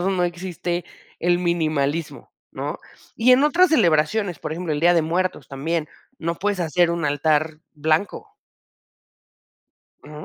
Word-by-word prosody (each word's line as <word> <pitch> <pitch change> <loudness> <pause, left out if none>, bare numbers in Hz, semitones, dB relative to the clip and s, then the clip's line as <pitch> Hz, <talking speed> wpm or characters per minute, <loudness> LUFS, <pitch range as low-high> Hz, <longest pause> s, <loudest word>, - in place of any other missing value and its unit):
Navidad - - -2
no 190 -1 0
existe 175 0 -3 0.4
el 175 +1 +2
minimalismo, 160 -3 -1 0.2
¿no? - - -4 0.4
Y 245 +3 +5
en 255 +2 +5
otras 340 +4 +4
celebraciones, 175 - +2
por - - -5
ejemplo, 170 0 -3
el 145 - -3
Día 175 +2 +5
de 165 - +3
Muertos 180 +4 -2
también, 155 +3 -3 0.3
no 170 +1 -2
puedes 205 0 -1
hacer 175 +1 +2
un 170 -1 -2
altar 155 +2 0
blanco 155 +5 -1 1.7
Ujú. 150 +1 -10
170 Hz, 140 wpm, -22 LUFS, 155-180 Hz, 1.7 s, Y